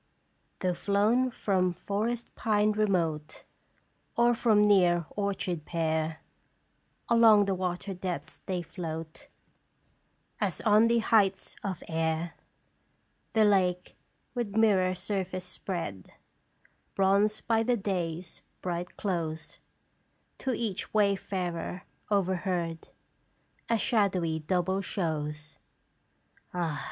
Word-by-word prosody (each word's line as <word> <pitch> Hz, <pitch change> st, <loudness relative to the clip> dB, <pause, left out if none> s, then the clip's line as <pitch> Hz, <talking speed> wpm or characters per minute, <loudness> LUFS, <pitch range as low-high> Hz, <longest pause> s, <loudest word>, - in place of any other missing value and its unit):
" -, -, -43 dB
Though 180 Hz, -1 st, +1 dB
flown 210 Hz, +8 st, +2 dB
from 185 Hz, -6 st, +1 dB
forest 220 Hz, +6 st, -3 dB
pine 210 Hz, -1 st, +2 dB
remote, 175 Hz, -8 st, 0 dB, 0.7 s
Or 240 Hz, 0 st, +5 dB
from 220 Hz, -3 st, +4 dB
near 175 Hz, -4 st, +4 dB
orchard 190 Hz, -5 st, -2 dB
pear, 160 Hz, -1 st, -1 dB, 0.9 s
Along 225 Hz, -3 st, +6 dB
the 195 Hz, -, 0 dB
water 185 Hz, +1 st, -3 dB
depths 180 Hz, -1 st, -5 dB
they 180 Hz, -2 st, -1 dB
float, 165 Hz, -2 st, -7 dB, 1.1 s
As -, -, -1 dB
on 215 Hz, +1 st, +5 dB
the 235 Hz, 0 st, +3 dB
heights 205 Hz, -4 st, +2 dB
of 190 Hz, -4 st, -4 dB
air. 160 Hz, +1 st, -1 dB, 0.5 s
" -, -, -43 dB
The 220 Hz, -1 st, +5 dB
lake, 180 Hz, -3 st, +2 dB, 0.4 s
with 235 Hz, -5 st, -3 dB
mirror 195 Hz, -5 st, +4 dB
surface 185 Hz, -1 st, -3 dB
spread, 170 Hz, -, -5 dB, 0.8 s
Bronzed 200 Hz, +2 st, +2 dB
by 225 Hz, -1 st, +3 dB
the 240 Hz, +1 st, +2 dB
day's 180 Hz, -4 st, -3 dB, 0.2 s
bright 175 Hz, 0 st, -4 dB
close, 165 Hz, -5 st, -3 dB, 0.8 s
To 265 Hz, -, -1 dB
each 220 Hz, -4 st, -3 dB
wayfarer 190 Hz, -4 st, 0 dB, 0.3 s
overhead, 180 Hz, -4 st, -1 dB, 0.8 s
A 230 Hz, -, +3 dB
shadowy 190 Hz, -9 st, +1 dB
double 185 Hz, +4 st, 0 dB
shows. 155 Hz, -5 st, -3 dB, 1.0 s
"Ah 165 Hz, -4 st, -1 dB
190 Hz, 105 wpm, -29 LUFS, 170-210 Hz, 1.1 s, Along